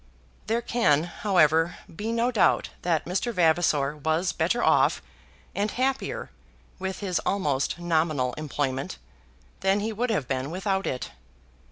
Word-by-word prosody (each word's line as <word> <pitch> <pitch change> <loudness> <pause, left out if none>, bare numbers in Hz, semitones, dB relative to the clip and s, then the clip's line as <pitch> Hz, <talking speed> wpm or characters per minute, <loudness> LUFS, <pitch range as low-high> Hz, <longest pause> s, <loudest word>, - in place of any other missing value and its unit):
There 230 +2 0
can, 155 -13 +2
however, 170 -3 +2 0.2
be 215 +6 -3
no 235 +2 +1
doubt 220 -6 +3
that 170 -3 0
Mr. 195 +7 -1
Vavasor 160 -6 +2
was 160 +5 0
better 180 +9 0
off - - +4 0.5
and 205 +2 0
happier 265 +3 -2 0.5
with 190 +1 -4
his 185 -3 0
almost 145 -9 0
nominal 155 -7 0
employment 135 - -3 0.6
than 195 +1 +2
he 220 +1 -2
would 240 +4 -1
have 175 - 0
been 130 +1 -2
without 190 +2 -1
it. 125 - -3
175 Hz, 135 wpm, -26 LUFS, 150-205 Hz, 0.6 s, off